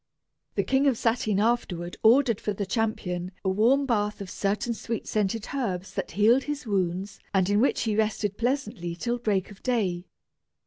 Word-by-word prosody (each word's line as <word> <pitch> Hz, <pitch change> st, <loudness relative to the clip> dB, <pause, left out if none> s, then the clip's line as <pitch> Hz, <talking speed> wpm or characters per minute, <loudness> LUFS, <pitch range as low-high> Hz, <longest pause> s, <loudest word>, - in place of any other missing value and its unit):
The -, -, +2 dB
King 270 Hz, +1 st, +2 dB
of 265 Hz, -, +4 dB
Satyn 225 Hz, -4 st, +1 dB
afterward 195 Hz, -6 st, 0 dB
ordered 235 Hz, -1 st, +4 dB
for 210 Hz, -, -1 dB
the 200 Hz, +1 st, -3 dB
champion 185 Hz, -4 st, -2 dB
a -, -, +3 dB
warm 235 Hz, +9 st, +3 dB
bath 210 Hz, -4 st, 0 dB
of 195 Hz, -2 st, -7 dB
certain 210 Hz, +4 st, -1 dB
sweet 230 Hz, 0 st, -4 dB
scented 215 Hz, +1 st, -1 dB
herbs 195 Hz, -9 st, -2 dB
that 195 Hz, -, -4 dB
healed 230 Hz, +6 st, +4 dB
his 295 Hz, -2 st, -4 dB
wounds 190 Hz, -1 st, -1 dB, 0.2 s
and 190 Hz, -1 st, +3 dB
in 205 Hz, +1 st, +3 dB
which 270 Hz, -, +2 dB
he 220 Hz, -2 st, 0 dB
rested 210 Hz, -2 st, 0 dB
pleasantly 230 Hz, -9 st, -2 dB
till 240 Hz, +6 st, -2 dB
break 205 Hz, -4 st, 0 dB
of 200 Hz, -, -14 dB
day. 190 Hz, -8 st, -1 dB
215 Hz, 175 wpm, -27 LUFS, 190-240 Hz, 0.2 s, of